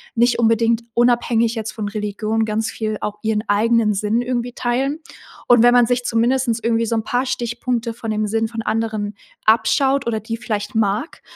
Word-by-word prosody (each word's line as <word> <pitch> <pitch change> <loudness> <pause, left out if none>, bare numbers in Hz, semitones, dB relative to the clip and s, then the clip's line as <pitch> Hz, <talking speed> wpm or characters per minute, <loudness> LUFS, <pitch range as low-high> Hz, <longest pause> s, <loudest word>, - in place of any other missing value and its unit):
nicht 240 +1 +2
unbedingt 230 0 +2
unabhängig 235 -1 +2
jetzt 220 -1 -4
von 215 -2 -4
Religion 215 +1 -2
ganz 220 +1 -2
viel 215 -1 -3
auch 210 0 -4
ihren 220 -1 0
eigenen 220 +1 +3
Sinn 210 +4 0
irgendwie 245 -1 -2
teilen. 265 +6 -1 0.5
Und 240 -2 +6
wenn 245 0 +6
man 245 -1 +6
sich 245 +1 0
zumindest 240 +3 +1
irgendwie 230 0 +1
so 230 - 0
'n 220 - -1
paar 245 +4 -1
Stichpunkte 240 -1 -2
von 225 -1 -5
dem 215 0 0
Sinn 225 +2 0
von 225 0 -5
anderen 215 -2 -2 0.3
abschaut 265 +4 +3
oder 225 -2 0
die 225 +2 -4
vielleicht 210 -3 -4
mag 220 - -1
225 Hz, 180 wpm, -20 LUFS, 215-240 Hz, 0.5 s, Und